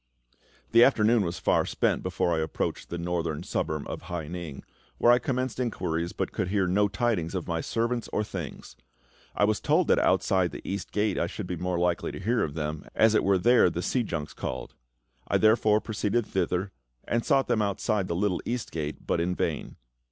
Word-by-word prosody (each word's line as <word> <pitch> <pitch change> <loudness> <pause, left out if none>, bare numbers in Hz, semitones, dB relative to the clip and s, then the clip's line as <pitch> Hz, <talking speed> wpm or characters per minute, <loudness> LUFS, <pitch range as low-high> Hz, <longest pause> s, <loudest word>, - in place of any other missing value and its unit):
The 115 +1 +7
afternoon 115 -3 +4
was 85 -1 -3
far - - +2
spent - - 0
before 85 - 0
I - - 0
approached 80 0 -3
the 85 - -4
northern 85 -3 -2
suburb 75 -2 -2
of - - -5
Hai 85 -4 -4
ning, 85 -4 -6 0.3
where 120 - +5
I 120 - +5
commenced 130 -1 -2
inquiries, 85 -8 -1
but - - -3
could 90 - -2
hear 95 0 +1
no 100 +3 +3
tidings 100 -4 -1
of 90 - -3
my 85 -2 -1
servant 115 +3 -1
or 105 - 0
things. 90 -8 -7 0.6
I - - +2
was 105 0 +2
told - - +2
that - - +5
outside 95 -2 +2
the - - -9
East 100 +1 -4
Gate 105 -2 0
I - - +1
should 100 +3 -6
be 90 - -3
more 90 +1 -2
likely 90 0 0
to - - -6
hear 115 +5 +1
of 75 -1 -2
them, 75 -1 -3
as 110 -1 +5
it 110 - +3
was 95 -2 +2
there 120 -5 +6
the 85 +1 -4
sea 125 - +1
junks 85 -9 -4
called. - - -5 0.5
I - - +2
therefore 110 -1 +4
proceeded 110 +1 -1
thither, 95 +1 -1 0.4
and 115 0 0
sought 135 -1 +3
for - - -3
them 110 - +1
outside 100 -1 0
the 85 - -2
Little 95 0 0
East 120 -1 -3
Gate, 75 -2 -5
but - - 0
in 90 +2 0
vain. - - -2
95 Hz, 205 wpm, -27 LUFS, 85-110 Hz, 0.6 s, The